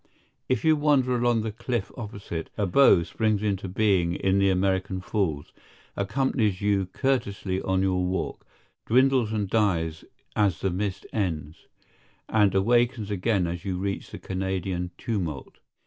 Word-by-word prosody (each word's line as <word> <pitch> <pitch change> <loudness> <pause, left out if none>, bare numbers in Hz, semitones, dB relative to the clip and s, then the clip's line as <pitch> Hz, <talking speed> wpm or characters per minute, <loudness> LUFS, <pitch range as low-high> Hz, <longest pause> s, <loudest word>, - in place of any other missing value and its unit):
If 130 - 0
you 160 -1 +6
wander 145 -4 +2
along 120 -2 +2
the 110 - -2
cliff 120 -1 -3
opposite, 100 -7 -6
a 105 - +1
bow 95 -3 +5
springs 105 +4 0
into 100 -2 -1
being 90 -3 +1
in 95 +1 +1
the 100 0 +4
American 95 0 0
Falls, 90 -7 -2 0.4
accompanies 105 -2 0
you 100 -2 +1
courteously 100 -5 -1
on 95 0 0
your 90 -1 +1
walk, 90 +1 -3 0.4
dwindles 130 -2 +3
and 105 -2 -1
dies 85 -7 0 0.3
as 100 -3 +1
the 95 - 0
mist 95 +1 -3
ends, 80 -7 -3 0.6
and 105 -3 +3
awakens 115 +1 +2
again 100 -1 +1
as 85 0 -4
you 95 -2 -2
reach 100 +1 -3
the - - -8
Canadian 95 -1 -3
tumult. 85 - -4
100 Hz, 145 wpm, -26 LUFS, 95-110 Hz, 0.6 s, you